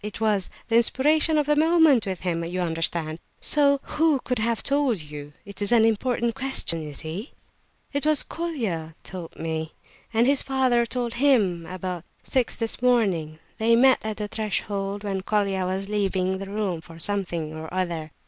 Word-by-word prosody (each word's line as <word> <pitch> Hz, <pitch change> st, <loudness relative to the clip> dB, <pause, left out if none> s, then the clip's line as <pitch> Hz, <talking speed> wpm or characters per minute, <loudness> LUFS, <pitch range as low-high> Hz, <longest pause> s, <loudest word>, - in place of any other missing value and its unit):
It 210 Hz, -1 st, -6 dB
was 210 Hz, -4 st, +1 dB, 0.2 s
the 230 Hz, -, +3 dB
inspiration 305 Hz, +6 st, +4 dB
of 300 Hz, -, +2 dB
the 295 Hz, +1 st, +3 dB
moment 315 Hz, -7 st, +4 dB
with 190 Hz, -2 st, -3 dB
him, 170 Hz, -2 st, -1 dB
you 175 Hz, +2 st, -3 dB
understand, 165 Hz, -1 st, -1 dB, 0.2 s
so 280 Hz, -2 st, +4 dB
who 310 Hz, -3 st, +2 dB
could 250 Hz, -2 st, -1 dB
have 230 Hz, +1 st, 0 dB
told 280 Hz, -6 st, +2 dB
you? 150 Hz, -1 st, -9 dB
It 200 Hz, 0 st, -11 dB
is 205 Hz, -, -1 dB
an 230 Hz, -2 st, +6 dB
important 235 Hz, +1 st, +1 dB
question, 265 Hz, -11 st, -1 dB
you 150 Hz, -1 st, -6 dB
see!" 160 Hz, -, -6 dB, 0.6 s
"It 285 Hz, -, -1 dB
was 305 Hz, -1 st, +3 dB
Colia 220 Hz, -, -4 dB
told 180 Hz, -3 st, -8 dB
me, 160 Hz, -1 st, -4 dB, 0.4 s
and 230 Hz, +1 st, +3 dB
his 275 Hz, +1 st, +3 dB
father 255 Hz, -3 st, +2 dB
told 240 Hz, -1 st, -1 dB
him 200 Hz, -12 st, +3 dB
at 185 Hz, -, -6 dB
about 180 Hz, -2 st, -4 dB, 0.2 s
six 255 Hz, -3 st, 0 dB
this 225 Hz, +1 st, -2 dB
morning. 195 Hz, -11 st, +2 dB, 0.2 s
They 230 Hz, +1 st, +4 dB
met 260 Hz, +2 st, +5 dB
at 215 Hz, -1 st, -3 dB
the 210 Hz, -1 st, -3 dB
threshold, 205 Hz, -2 st, -3 dB
when 195 Hz, -2 st, -2 dB
Colia 195 Hz, -2 st, 0 dB
was 190 Hz, +1 st, -2 dB
leaving 190 Hz, -2 st, 0 dB
the 195 Hz, -, -6 dB
room 200 Hz, -5 st, -2 dB
for 165 Hz, 0 st, -13 dB
something 170 Hz, -4 st, -3 dB
or 160 Hz, 0 st, -7 dB
other." 170 Hz, -4 st, -2 dB
205 Hz, 175 wpm, -25 LUFS, 175-250 Hz, 0.6 s, an